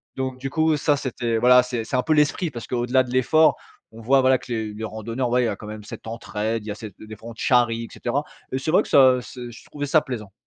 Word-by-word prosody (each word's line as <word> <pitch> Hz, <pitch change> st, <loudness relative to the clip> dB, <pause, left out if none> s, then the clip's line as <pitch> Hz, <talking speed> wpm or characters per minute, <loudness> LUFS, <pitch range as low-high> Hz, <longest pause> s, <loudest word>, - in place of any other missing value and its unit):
Donc 130 Hz, -1 st, -3 dB
du 135 Hz, +1 st, -5 dB
coup, 160 Hz, +2 st, +2 dB
ça 145 Hz, 0 st, +2 dB
c'était 120 Hz, -4 st, -2 dB
voilà, 125 Hz, +2 st, +6 dB
c'est 120 Hz, -2 st, -3 dB
c'est 110 Hz, -, -4 dB
un 125 Hz, -, +1 dB
peu 160 Hz, -, +2 dB
l'esprit 150 Hz, +3 st, +2 dB
parce 120 Hz, -3 st, -7 dB
qu'au 120 Hz, -1 st, -1 dB
delà 130 Hz, +1 st, +3 dB
de 125 Hz, -, -9 dB
l'effort, 155 Hz, +5 st, +4 dB, 0.4 s
on 115 Hz, +1 st, -12 dB
voit 135 Hz, +4 st, +4 dB
voilà, 130 Hz, 0 st, +4 dB
que 125 Hz, -, -12 dB
les 110 Hz, -2 st, -2 dB
les 110 Hz, +1 st, -7 dB
randonneurs, 115 Hz, +3 st, -3 dB
ouais 125 Hz, +1 st, +2 dB
il 115 Hz, -, 0 dB
y -, -, -4 dB
quand 105 Hz, -, -10 dB
même 105 Hz, 0 st, -8 dB
cette 105 Hz, -, -10 dB
entraide, 110 Hz, -1 st, -3 dB
il -, -, -11 dB
y -, -, -3 dB
a -, -, -5 dB
cette 105 Hz, -2 st, -9 dB
des 110 Hz, 0 st, -10 dB
fois 110 Hz, +3 st, -11 dB
on -, -, -8 dB
te 115 Hz, -, -11 dB
charrie 120 Hz, -3 st, +2 dB
et -, -, -10 dB
cetera 130 Hz, +4 st, -2 dB, 0.3 s
et 130 Hz, -, -1 dB
c'est 135 Hz, -, -4 dB
vrai 175 Hz, -, +4 dB
que -, -, -11 dB
ça 130 Hz, -2 st, +6 dB
c'est 125 Hz, 0 st, -9 dB
je 115 Hz, -, -14 dB
trouvais 145 Hz, -1 st, -5 dB
ça 155 Hz, +2 st, +4 dB
plaisant. 110 Hz, -8 st, -7 dB
125 Hz, 295 wpm, -23 LUFS, 110-130 Hz, 0.4 s, voilà